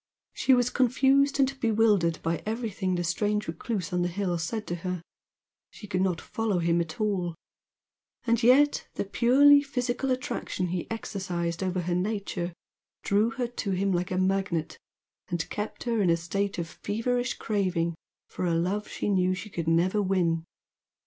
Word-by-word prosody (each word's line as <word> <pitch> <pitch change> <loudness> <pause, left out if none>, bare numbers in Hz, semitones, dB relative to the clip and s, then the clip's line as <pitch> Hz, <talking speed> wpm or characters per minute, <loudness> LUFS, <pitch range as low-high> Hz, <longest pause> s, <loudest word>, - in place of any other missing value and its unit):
She 265 - +4
was 245 0 +1
confused 270 +2 +3
and 270 0 +2
bewildered 210 -7 +3
by 165 0 -1
everything 215 -4 -2
the 175 - -1
strange 210 +5 0
recluse 180 +1 -3
on 180 - +1
the 175 - +1
hill 180 0 -1
said 210 +7 -3
to 175 - -3
her, 180 0 -4 0.7
she - - -11
could 185 -2 -1
not 185 -4 +1
follow 220 -4 -2
him 170 0 +2
at 160 -2 -6
all, 190 -6 0 0.9
and 230 -1 +2
yet, 270 +5 +4
the - - -2
purely 275 +7 +6
physical 260 -1 -2
attraction 255 -7 -2
he 175 -1 -3
exercised 180 -6 -3
over 185 -1 -1
her 175 +1 -2
nature 185 -2 -2 0.5
drew 205 +3 +2
her 245 +2 -2
to 235 -4 -4
him 195 +2 +1
like 180 0 0
a 185 - -2
magnet 185 -4 0 0.5
and 175 -3 -2
kept 210 +1 -4
her 230 -3 0
in 185 - +3
a 170 - +4
state 195 +4 -2
of 170 -1 -2
feverish 245 +7 -2
craving 185 -5 0 0.3
for 185 - -3
a 170 - +1
love 190 +5 -1
she - - -4
knew 185 -2 +2
she 205 +3 -8
could 170 -3 -4
never 180 +5 +3
win. 175 -4 +1
195 Hz, 170 wpm, -27 LUFS, 175-225 Hz, 0.9 s, purely